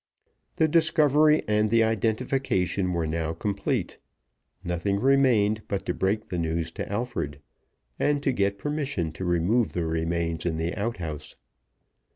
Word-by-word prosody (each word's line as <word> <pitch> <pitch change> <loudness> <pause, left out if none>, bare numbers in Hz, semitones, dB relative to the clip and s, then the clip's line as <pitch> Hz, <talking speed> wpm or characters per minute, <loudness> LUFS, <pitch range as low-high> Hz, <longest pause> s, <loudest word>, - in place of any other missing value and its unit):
The 160 - +3
discovery 155 -1 +4
and 105 0 +2
the 115 +1 +4
identification 110 -4 0
were 85 -2 -1
now 80 0 -2
complete. 100 +4 -2 0.6
Nothing 90 +3 -1
remained 120 -5 +3
but 100 - -3
to - - -1
break 105 +3 -1
the 90 - -2
news 80 0 -1
to - - -6
Alfred, 110 - -3 0.6
and 145 -1 +1
to 135 - +2
get 100 -4 0
permission 140 - -2
to 80 +5 -7
remove 90 +6 +1
the 85 -2 -1
remains 80 0 -1
in 80 -2 -1
the 80 +1 -2
outhouse. 85 -9 -4
100 Hz, 140 wpm, -26 LUFS, 85-125 Hz, 0.6 s, discovery